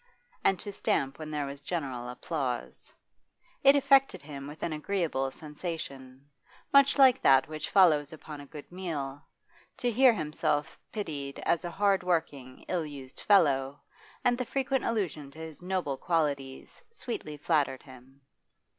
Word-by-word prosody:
and 195 - +3
to 205 - -6
stamp 135 -6 -1
when 155 -1 -6
there 150 -2 -2
was 140 0 -7
general 135 -6 -4
applause; 125 -1 -4 0.7
it 275 +1 +8
affected 275 -1 +4
him 140 -2 -8
with 150 +2 -9
an 165 - -1
agreeable 155 -5 -1
sensation, 140 -4 -7 0.5
much 280 0 +6
like 265 -3 +6
that 135 -1 +5
which 155 0 -5
follows 155 -7 +5
upon 155 -2 -9
a 145 - -12
good 150 +3 -11
meal, 150 -7 -4 0.6
to 245 - 0
hear 255 +2 +6
himself 150 -4 -1
pitied 145 -10 -4
as 170 - +2
a 175 - -3
hard 200 +1 +2
working, 150 -8 -2
ill 175 -3 0
used 140 -4 -9
fellow, 140 -8 +3 0.5
and 245 0 +3
the - - +1
frequent 270 +1 -1
allusion 180 -11 -2
to 140 - -17
his 160 -1 -8
noble 180 -7 -2
qualities 140 -6 -2
sweetly 235 - -6
flattered 145 -4 0
him. 130 +1 -16
155 Hz, 145 wpm, -29 LUFS, 140-190 Hz, 0.7 s, it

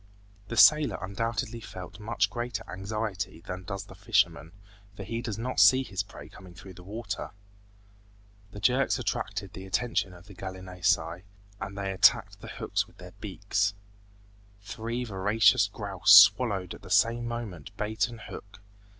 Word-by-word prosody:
The 115 - -5
sailor 150 +2 +6
undoubtedly 115 +3 -3
felt 95 0 -9
much 105 -2 0
greater 120 +2 -4
anxiety 100 -1 -4
than 90 +1 -7
does 95 +1 -5
the 100 - -13
fisherman, 95 -6 +1 0.4
for 100 - -7
he 115 +4 -4
does 115 -4 -4
not 125 +3 -2
see 130 0 +7
his 100 -6 -3
prey 100 - -11
coming 90 -2 -14
through 95 +2 -11
the 90 0 -13
water. 105 +1 -5 1.2
The 105 - -10
jerks 125 +7 +2
attracted 100 -4 -3
the 95 0 -8
attention 95 -2 -1
of 90 0 -15
the 100 - -13
gallinaceae, 90 -3 -2 0.4
and 95 +1 -6
they 100 -1 -2
attacked 95 - +3
the - - -9
hooks - - -2
with - - -23
their - - -12
beaks. 100 0 -1 0.9
Three 115 +4 -4
voracious 105 0 +3
grouse 100 -2 0
swallowed 100 -2 +7
at - - -12
the - - -12
same 120 +1 +3
moment 110 -10 -6
bait 105 0 0
and 115 -2 -11
hook. 100 -1 -11
100 Hz, 155 wpm, -28 LUFS, 95-115 Hz, 1.2 s, see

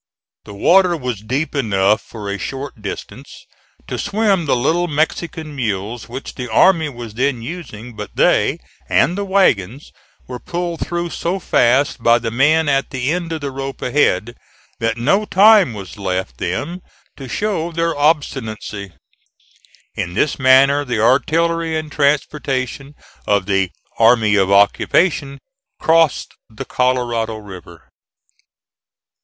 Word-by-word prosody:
The 100 - -10
water 180 - +4
was 125 -7 -4
deep 130 +8 -2
enough 105 -6 +1
for 105 -3 -9
a 100 0 -3
short 135 -4 -6
distance 100 - -8 0.4
to - - -5
swim 200 -5 0
the - - +3
little 165 +8 +1
Mexican 155 0 -2
mules 110 -2 -3
which 130 +3 -7
the 125 -3 -6
army 160 +5 +4
was 120 -5 -9
then 125 0 -1
using, 125 -6 -8
but 105 -1 -8
they, - - +2 0.3
and 175 - +3
the 200 - -2
wagons, 145 - +1 0.4
were 125 -1 -7
pulled 175 -1 -4
through 170 +1 -3
so 175 +5 -2
fast 135 -6 +2
by 115 +1 +5
the 115 -1 -4
men 150 +6 +3
at 135 -1 +1
the 130 0 -2
end 170 -1 -3
of 160 -1 -4
the 140 -1 -4
rope 135 0 -6
ahead, 120 -5 +1 0.5
that 115 0 -1
no 155 - +2
time 205 - +5
was 100 +1 -9
left 90 -10 -3
them 180 +2 -3 0.3
to 135 -3 -9
show 180 - -2
their 165 0 -1
obstinacy. 115 - -1 1.0
In 85 0 -4
this 145 +7 0
manner 135 +2 +5
the 125 -5 -2
artillery 165 +7 +1
and 155 -1 -5
transportation 140 -2 -1 0.3
of 100 -2 +2
the 95 -2 +1 0.3
"army 115 -2 +4
of 100 -1 +2
occupation" 140 - +2 0.4
crossed 165 -2 +2 0.2
the 110 - -8
Colorado 120 -3 0
River. 95 -5 -12
135 Hz, 140 wpm, -18 LUFS, 110-160 Hz, 1.0 s, by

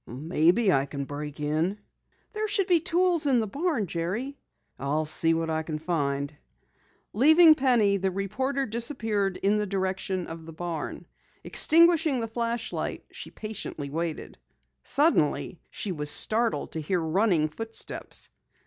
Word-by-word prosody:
"Maybe 170 - +2
I 135 +1 +1
can 140 0 -5
break 145 +1 -7
it." 155 +7 -1 0.5
"There 430 0 -2
should 405 -2 +2
be 355 -3 +4
tools 345 -1 +1
in 260 -3 +3
the 220 - 0
barn, 285 - -1
Jerry." 190 - -3 0.4
"I'll 150 +3 -1
see 165 +2 +1
what 165 0 -2
I 160 0 0
can 155 -1 -4
find." 145 -3 -2 0.8
Leaving 315 - +7
Penny, 240 -8 +2
the 190 0 0
reporter 260 +9 -2
disappeared 220 -5 0
in 205 +2 +1
the 210 - -1
direction 190 -1 -2
of 165 0 -9
the 165 - -9
barn. 165 -2 -5 0.4
Extinguishing 325 -4 +4
the 225 - -3
flashlight, 230 +1 -3
she - - -7
patiently 190 -9 -6
waited. 165 +1 -4 0.4
Suddenly 275 - +1
she 205 - -3
was 150 -4 -1
startled 220 -3 +2
to 160 - -4
hear 180 +4 -1
running 165 0 +1
footsteps. 225 +8 -5
195 Hz, 140 wpm, -27 LUFS, 160-245 Hz, 0.8 s, Leaving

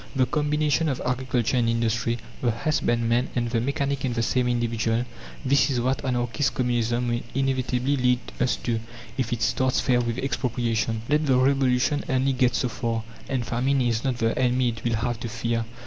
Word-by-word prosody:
The 130 -1 +3
combination 150 +2 +1
of 135 - -2
agriculture 125 -1 0
and 115 -1 +2
industry, 115 0 0 0.2
the 120 - +2
husbandman 120 -1 +1
and 120 -1 -1
the 115 -2 +1
mechanic 140 +1 -1
in 130 -2 0
the 115 -1 0
same 125 +1 +1
individual 115 -1 0 0.4
this 140 +2 +4
is 130 -3 0
what 130 +3 0
anarchist 125 +2 0
communism 120 -1 0
will 120 0 0
inevitably 130 0 0
lead 125 -1 +3 0.2
us 125 - +2
to, 115 -2 0 0.4
if 125 -3 -2
it 115 -2 -1
starts 130 +3 +1
fair 125 -2 +2
with 120 0 -2
expropriation. 120 -3 -1
Let 150 +1 +2
the 130 -2 +4
Revolution 130 +1 +2
only 130 +1 +2
get 125 -1 +2
so 125 - +1
far, 115 -1 -2 0.3
and 130 -4 -1
famine 130 +4 +1
is 120 -3 +1
not 130 -3 0
the 115 -1 +1
enemy 125 -1 +2
it 115 -1 -6
will 115 -1 +1
have 115 +1 -2
to 120 - -4
fear. 115 0 -1
125 Hz, 185 wpm, -25 LUFS, 115-130 Hz, 0.4 s, this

